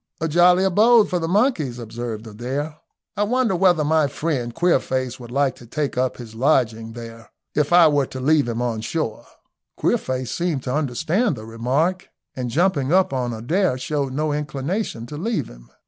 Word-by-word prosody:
"A 165 - -1
jolly 175 +3 +5
abode 210 +3 +5
for 180 - +1
the 165 - -2
monkeys," 180 - +1
observed 115 -1 -6
Adair. 130 +8 -4 0.4
"I - - -2
wonder 225 -1 +1
whether 175 -3 +3
my 155 0 +3
friend 140 -6 -2
Queerface 130 -5 0
would 120 -2 -10
like 135 +1 +1
to 120 - -14
take 145 +4 -2
up 130 0 0
his 115 -3 -10
lodgings 115 -3 +1
there, 115 -1 -10 0.2
if 150 +1 0
I 175 -2 +7
were 145 -3 +2
to 130 - -7
leave 145 +1 +3
him 120 +1 -2
on 115 -3 -2
shore?" 115 -2 -3 0.5
Queerface 130 -1 -1
seemed 170 -6 -1
to 125 - -3
understand 155 - 0
the 110 -2 -9
remark, 135 +11 -1 0.3
and 125 -2 -3
jumping 145 -1 +1
up 185 -5 +3
on 125 -2 -1
Adair, 130 - 0
showed 140 +1 -2
no 150 +2 -1
inclination 145 - -3
to 150 +4 -8
leave 220 +6 -2
him. - - -15
140 Hz, 180 wpm, -22 LUFS, 120-170 Hz, 0.5 s, I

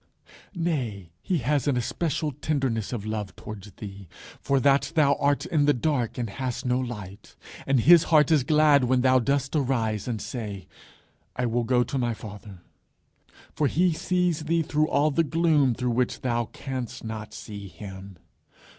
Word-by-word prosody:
Nay, 125 - -2
he 180 - 0
has 145 +1 +1
an 135 -3 +2
especial 150 +5 -1
tenderness 130 -6 -2
of 110 -5 -4
love 105 -3 -4
towards 105 -1 -9
thee 100 -2 -9 0.3
for 140 -1 +1
that 140 +2 +3
thou 145 -3 +5
art 145 +1 +1
in 155 -5 +1
the 145 - +4
dark 125 -3 -1
and 120 -2 -2
hast 125 +5 -4
no 125 0 +1
light, 105 -6 -7 0.3
and 135 -3 +3
his 170 +5 +7
heart 155 -2 +4
is 150 -5 +4
glad 150 -2 +4
when 125 0 +2
thou 130 0 +4
dost 140 +3 0
arise 120 -7 0
and 115 -3 -2
say, 105 -7 -6 0.7
"I 125 - -1
will 120 0 0
go 125 0 +3
to 135 - -3
my 120 -2 0
Father." 100 -4 -11 0.9
For 150 - +1
he 175 +4 +2
sees 175 -2 0
thee 165 +1 +1
through 150 +1 +1
all 150 +1 +2
the 165 +4 +2
gloom 155 -5 +2
through 125 +1 -1
which 125 +1 -1
thou 120 -3 0
canst 130 -1 -6
not 110 -1 -6
see 100 -2 -8
him. 95 -1 -10
130 Hz, 170 wpm, -26 LUFS, 110-150 Hz, 0.9 s, his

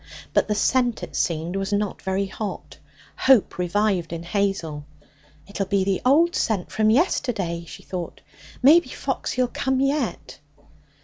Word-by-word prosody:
But - - +3
the 210 - 0
scent, 245 +3 +1
it - - -7
seemed, 165 +2 -1
was 195 +1 -2
not 205 -1 -1
very 190 +1 -1
hot. 200 +2 -6 0.4
Hope 260 -8 +3
revived 180 -1 0
in 170 0 -5
Hazel. 175 -5 -2 0.6
'It'll 200 -1 -4
be 195 0 +1
the 190 -1 0
old 320 +7 +4
scent 205 -5 -1
from 215 0 +2
yesterday,' 220 - 0
she - - -11
thought. 180 -3 -6 0.4
'Maybe 325 +6 +6
Foxy'll 255 0 -2
come 265 +1 -1
yet!' 270 - -1
200 Hz, 140 wpm, -23 LUFS, 180-250 Hz, 0.6 s, Maybe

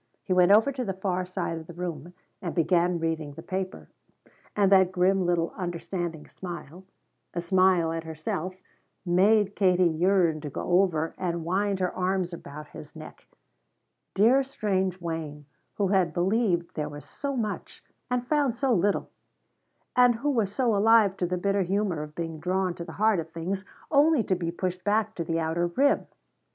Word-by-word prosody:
He 185 - 0
went 180 +1 +5
over 220 +7 +6
to 260 -2 -3
the 195 -5 -3
far 185 -1 -2
side 180 -3 -3
of 160 - -12
the 170 - -10
room 175 -1 -6 0.3
and 175 -3 -4
began 175 +1 +2
reading 160 -3 -2
the 160 - -10
paper, 185 +1 -4 0.7
and 200 -2 +3
that 190 -2 +5
grim 185 0 +2
little 170 -1 0
understanding 175 -3 -4
smile 175 0 -9 0.5
a - - 0
smile 185 -2 +3
at 165 0 -3
himself 160 +3 -4 0.5
made 200 +3 +3
Katie 185 -2 +3
yearn 170 -1 +2
to 150 - -5
go 175 +6 +2
over 165 -4 -1
and 170 -3 -2
wind 195 +3 0
her 180 -1 -1
arms 185 -1 -1
about 150 -2 -9
his - - -12
neck - - -12 0.9
dear 235 +8 +5
strange 190 -8 -1
Wayne 160 -4 -5 0.3
who 200 -2 0
had 185 -5 +2
believed 180 -2 +1
there 150 -1 -3
was 145 0 -10
so 280 -1 -4
much, 215 -3 -4 0.3
and 250 -1 -1
found 285 -3 +1
so 260 0 +1
little, 200 0 +1 0.8
and 245 -1 +5
who 290 +6 -1
was 220 -7 0
so 235 -1 +1
alive 215 -1 +5
to 180 - 0
the 180 +1 -1
bitter 200 +2 +1
humor 190 -3 0
of 150 0 -8
being 165 -2 -4
drawn 185 +2 0
to 170 - -7
the - - -9
heart 215 -2 +2
of 165 0 -5
things 175 +4 -4 0.3
only 295 -3 +4
to 190 - 0
be 170 -2 -3
pushed 180 +1 -3
back 215 +1 +1
to 170 - -3
the 165 0 -1
outer 165 +2 0
rim. 275 +11 +2
185 Hz, 175 wpm, -27 LUFS, 170-200 Hz, 0.9 s, over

